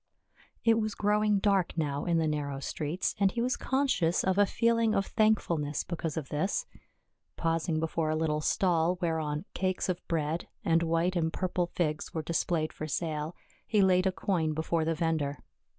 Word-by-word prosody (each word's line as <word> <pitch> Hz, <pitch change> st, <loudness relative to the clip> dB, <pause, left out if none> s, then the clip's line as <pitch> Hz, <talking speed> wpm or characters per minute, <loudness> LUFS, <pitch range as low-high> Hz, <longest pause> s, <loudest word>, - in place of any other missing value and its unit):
It 225 Hz, -1 st, +4 dB
was 215 Hz, -1 st, -2 dB
growing 210 Hz, 0 st, +2 dB
dark 195 Hz, -3 st, +1 dB
now 145 Hz, -3 st, -1 dB
in 170 Hz, -1 st, +2 dB
the 165 Hz, -, +2 dB
narrow 145 Hz, -2 st, -2 dB
streets, 150 Hz, +5 st, -2 dB
and 195 Hz, -1 st, +4 dB
he 235 Hz, -, -4 dB
was 250 Hz, +2 st, +1 dB
conscious 260 Hz, -11 st, +1 dB
of 190 Hz, +1 st, +1 dB
a 205 Hz, -, +5 dB
feeling 230 Hz, -1 st, +2 dB
of 195 Hz, -, +1 dB
thankfulness 170 Hz, -9 st, +1 dB
because 165 Hz, -2 st, -4 dB
of 150 Hz, -4 st, -4 dB
this. 155 Hz, +7 st, -1 dB, 0.7 s
Pausing 165 Hz, -1 st, 0 dB
before 160 Hz, 0 st, -1 dB
a 155 Hz, -, +1 dB
little 155 Hz, -1 st, 0 dB
stall 175 Hz, +1 st, +2 dB
whereon 160 Hz, -2 st, -1 dB
cakes 185 Hz, 0 st, -1 dB
of 185 Hz, 0 st, -1 dB
bread, 160 Hz, 0 st, -1 dB, 0.2 s
and 165 Hz, 0 st, +3 dB
white 165 Hz, +2 st, +1 dB
and 160 Hz, -2 st, +1 dB
purple 180 Hz, -1 st, -1 dB
figs 155 Hz, -3 st, -2 dB
were 160 Hz, -, -1 dB
displayed 165 Hz, -1 st, 0 dB
for 155 Hz, -, -5 dB
sale, 155 Hz, +1 st, -2 dB, 0.3 s
he 210 Hz, -3 st, +3 dB
laid 185 Hz, 0 st, +4 dB
a -, -, +2 dB
coin 175 Hz, -5 st, 0 dB
before 160 Hz, +1 st, 0 dB
the 165 Hz, 0 st, 0 dB
vendor. 155 Hz, -4 st, -1 dB
170 Hz, 175 wpm, -30 LUFS, 155-190 Hz, 0.7 s, a